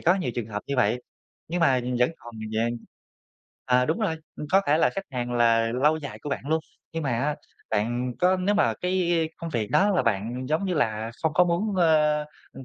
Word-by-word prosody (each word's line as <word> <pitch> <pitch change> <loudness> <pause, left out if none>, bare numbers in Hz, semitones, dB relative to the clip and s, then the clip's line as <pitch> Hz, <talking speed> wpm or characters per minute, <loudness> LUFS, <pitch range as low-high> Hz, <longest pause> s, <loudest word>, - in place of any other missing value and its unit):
có 175 - +4
nhiều 180 -10 -2
trường 120 -3 -3
hợp 105 -1 -5
như 140 - -2
vậy. 120 +1 +2 0.5
Nhưng 175 +1 -2
mà 130 -6 +4 0.2
vẫn 125 +5 +3
còn 120 -1 -12 0.2
về 115 +2 +1 1.0
ờ, 125 0 +3
đúng 160 +6 0
rồi, 180 -7 0 0.2
ừm, 150 - -5
có 195 - +6
thể 150 +2 +3
là - - +4
khách 195 0 -5
hàng 120 -1 -3
là 115 -1 +3
lâu 155 +2 +4
dài 145 -3 -7
của 145 - -5
bạn 140 - -4
luôn. 160 0 +2 0.3
Nhưng 165 -1 -3
mà 135 - -1
á, 140 +6 0 0.4
bạn 120 +4 0
có 185 +1 +4
nếu 195 +3 +1
mà 205 - +2
cái, 180 - -1
i, 175 -2 +2
i, 160 - -1
công 165 - -6
việc 110 -7 -2
đó 200 +2 +4
là 185 - +2
bạn, 115 +4 -1
giống 155 +5 +1
như 185 -2 -1
là, 110 -5 0
không 160 -1 +1
có 180 - +6
muốn, 190 +4 0
ơ, 155 -3 +4 0.3
ừm, 135 - -10
145 Hz, 235 wpm, -26 LUFS, 120-170 Hz, 1.0 s, có